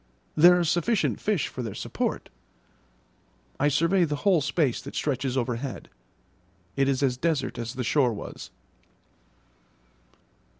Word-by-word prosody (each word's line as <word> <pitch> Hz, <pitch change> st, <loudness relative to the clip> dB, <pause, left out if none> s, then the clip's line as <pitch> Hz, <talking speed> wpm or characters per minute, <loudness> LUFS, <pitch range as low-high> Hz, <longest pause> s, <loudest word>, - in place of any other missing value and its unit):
There 175 Hz, +3 st, +7 dB
are 175 Hz, -, +1 dB
sufficient 175 Hz, +7 st, 0 dB
fish 205 Hz, -7 st, 0 dB
for 130 Hz, -, -6 dB
their 110 Hz, -5 st, -5 dB
support. -, -, -3 dB, 1.3 s
I 145 Hz, -, +3 dB
survey 165 Hz, +6 st, +3 dB
the 150 Hz, -3 st, 0 dB
whole 185 Hz, -6 st, +4 dB
space 145 Hz, -2 st, 0 dB
that 140 Hz, -, -9 dB
stretches 135 Hz, -2 st, -1 dB
overhead; 125 Hz, +1 st, -3 dB, 0.9 s
it 135 Hz, 0 st, +2 dB
is 135 Hz, 0 st, 0 dB
as 125 Hz, -2 st, +1 dB
desert 155 Hz, -4 st, -1 dB
as 120 Hz, +1 st, -5 dB
the 125 Hz, -, -3 dB
shore 130 Hz, 0 st, +2 dB
was. 105 Hz, -, -8 dB
140 Hz, 130 wpm, -26 LUFS, 125-170 Hz, 1.3 s, There